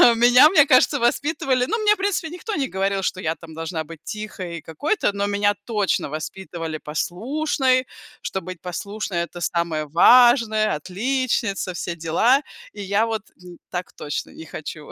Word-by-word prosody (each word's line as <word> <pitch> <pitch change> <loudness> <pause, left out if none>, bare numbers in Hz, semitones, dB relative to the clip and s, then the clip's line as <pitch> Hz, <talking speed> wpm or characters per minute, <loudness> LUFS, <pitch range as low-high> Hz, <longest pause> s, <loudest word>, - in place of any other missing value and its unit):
Меня, 245 +5 +7
мне 305 -7 +6
кажется, 285 +1 +4
воспитывали, 260 0 +1
но 445 - -1
мне, 425 -1 +4
в - - -23
принципе, 390 -4 -1
никто 360 +6 -5
не 275 -3 -1
говорил, 195 +1 -1
что 185 - -1
я 160 0 -1
там 165 -1 -13
должна 160 0 -4
быть 165 0 -11
тихой, 185 -6 -6
какой-то, 285 - -1
но 200 0 -1
меня 205 0 +2
точно 210 -9 0
воспитывали 165 +1 -5
послушной, 255 - -1 0.3
что 190 - -3
быть 185 -2 -9
послушной 195 +1 -4
это 175 0 -9
самое 165 -2 -1
важное, 220 - +5
отличница, 200 - -1
все 175 0 -4
дела. 220 - +3 0.3
И 205 - -8
я 200 +3 +1
вот, 220 -2 -3 0.5
так 180 -1 -5
точно 145 - -5
не 160 - -11
хочу 155 -1 -8
200 Hz, 155 wpm, -22 LUFS, 170-255 Hz, 0.5 s, Меня